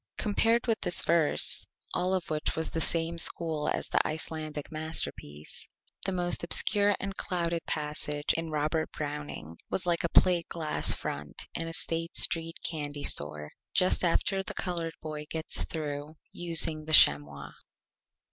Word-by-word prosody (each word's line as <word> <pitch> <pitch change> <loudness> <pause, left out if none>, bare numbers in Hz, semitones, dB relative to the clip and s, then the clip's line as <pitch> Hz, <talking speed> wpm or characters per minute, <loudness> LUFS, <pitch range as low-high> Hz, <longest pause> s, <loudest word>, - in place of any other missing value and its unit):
Compared 225 +2 +1
with 225 -2 -1
this 175 - +2
Verse, 165 -2 +1 0.3
all 185 +1 +1
of 180 -5 -3
which 155 0 -1
was 160 0 -2
of - - -18
the 165 - -2
same 165 0 -1
School 160 -2 +2
as - - -3
the - - +1
Icelandic 155 -1 -5
Masterpiece, 155 - -4 0.4
the - - 0
most 175 -2 +3
obscure 205 +3 +5
and 195 0 -5
clouded 170 -3 -2
Passage 150 -1 0
in 165 0 -3
Robert 155 +1 -2
Browning 145 - -7
was 190 - -2
like 175 -1 0
a 170 - -1
Plate 175 -1 +3
Glass 160 -3 -1
Front 75 +1 -6
in 165 - -3
a 165 - -6
State 165 +1 -2
Street 165 0 +4
Candy 145 -3 -4
Store 75 0 +1 0.2
just 185 0 +3
after 190 +3 +1
the - - -6
Colored 170 -3 -3
Boy 150 -1 -6
gets 160 -1 0
through 150 -1 -5 0.2
using 165 -2 +2
the 155 - -3
Chamois. 70 - +5
160 Hz, 155 wpm, -28 LUFS, 150-170 Hz, 0.4 s, obscure